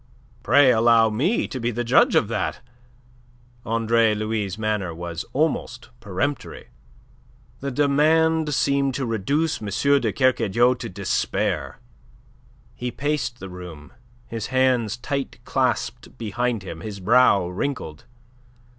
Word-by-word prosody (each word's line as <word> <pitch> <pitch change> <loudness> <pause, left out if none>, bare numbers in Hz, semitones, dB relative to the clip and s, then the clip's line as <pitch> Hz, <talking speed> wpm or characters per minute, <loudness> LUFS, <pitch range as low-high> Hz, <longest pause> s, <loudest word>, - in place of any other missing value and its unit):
"Pray 135 +2 +5
allow 115 -1 +4
me 150 - 0
to 130 - -6
be 120 0 -1
the 120 +1 -2
judge 120 +2 +4
of - - +3
that." - - -2 1.1
Andre 115 -1 +2
Louis' 105 -3 -2
manner 105 -6 -2
was 85 -1 -5
almost 135 -3 -1
peremptory. 115 +7 -4 0.9
The 140 - -3
demand 155 +3 +2
seemed 140 +1 +1
to 135 - -2
reduce 140 +9 -1
M. 105 - -5 0.3
de - - 0
Kercadiou 120 -2 +2
to - - -5
despair. 95 +1 -2 1.0
He 125 - -4
paced 125 -2 -2
the 95 - -7
room, 90 -5 -10 0.3
his 115 -2 -5
hands 130 -4 +1
tight 140 +2 -4
clasped - - -2
behind 115 0 -2
him, 85 -4 -7
his 105 -1 -7
brow 105 -2 +4
wrinkled. 90 - -4
120 Hz, 120 wpm, -23 LUFS, 105-135 Hz, 1.1 s, Pray